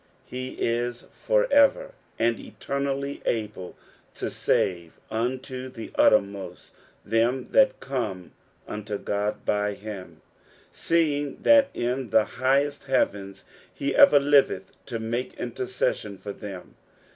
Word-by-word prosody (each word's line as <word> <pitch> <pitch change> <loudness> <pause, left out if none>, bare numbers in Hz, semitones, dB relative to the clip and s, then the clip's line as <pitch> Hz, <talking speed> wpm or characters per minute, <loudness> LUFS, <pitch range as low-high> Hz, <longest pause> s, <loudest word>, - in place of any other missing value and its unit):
He 130 +1 -6
is 120 +1 -2
for - - +2
ever 395 - +4 0.3
and 115 0 +1
eternally 140 0 -3
able 105 -5 -3 0.4
to - - -4
save 85 -3 0 0.2
unto 130 +3 -3
the 115 -3 -9
uttermost 100 -3 +1 0.3
them 120 +4 +1
that 270 -1 +4
come 110 -10 -4 0.4
unto 105 0 -4
Qod 105 +1 -2
by 105 0 +1
him, 95 -7 -9 0.5
seeing 145 -4 0
that 280 -1 +6
in 125 +1 -2
the 110 +1 +4
highest 140 +3 0
heavens 100 -7 -1 0.3
he 140 0 -2
everliveth 140 -9 +5 0.2
to 120 - -3
make 115 +3 -3
interces 125 +1 -1
sion 100 -2 -8
for 100 +1 -7
them. 100 -4 -9
120 Hz, 115 wpm, -26 LUFS, 105-140 Hz, 0.5 s, that